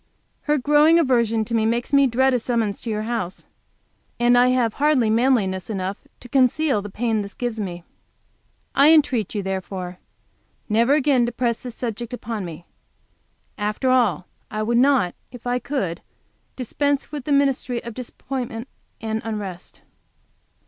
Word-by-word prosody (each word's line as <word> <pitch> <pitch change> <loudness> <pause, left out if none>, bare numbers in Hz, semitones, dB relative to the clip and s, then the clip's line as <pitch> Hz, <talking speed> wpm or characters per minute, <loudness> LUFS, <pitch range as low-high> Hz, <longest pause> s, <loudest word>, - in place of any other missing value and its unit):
Her 300 - +4
growing 295 +4 +5
aversion 235 -7 +2
to 235 - -6
me 225 -1 +2
makes 235 +4 -1
me 280 -1 +6
dread 260 +2 +2
a 250 - +2
summons 225 -4 -1
to 235 - -5
your 215 -1 -2
house, 220 -6 -4 0.7
and 240 0 +4
I 245 +1 +5
have 250 -3 +2
hardly 275 -7 +3
manliness 220 -6 +1
enough 195 -1 -4
to - - -11
conceal 260 -1 +2
the 205 - -7
pain 220 +1 -1
this 200 0 -8
gives 240 -4 -3
me. 175 -4 -5 0.9
I 285 +3 +6
entreat 260 - +3
you, 205 - -1
therefore, 185 -1 -5 0.7
never 235 +6 +3
again 270 -5 +3
to - - -2
press 235 -1 -1
this 245 -2 -7
subject 240 0 -4
upon 225 -3 -5
me. 170 0 -9 0.9
After 215 +5 0
all, 205 -10 +2 0.2
I 215 0 -2
would 235 +2 +2
not, 260 -10 +3 0.2
if 245 -1 -12
I 245 0 0
could, 200 - -3 0.5
dispense 285 +3 -1
with 290 -4 -6
the 295 - -2
ministry 270 -3 +1
of 235 - -7
disappointment 250 -1 -5 0.3
and 220 0 -2
unrest. 200 -5 -6
235 Hz, 155 wpm, -22 LUFS, 210-260 Hz, 0.9 s, me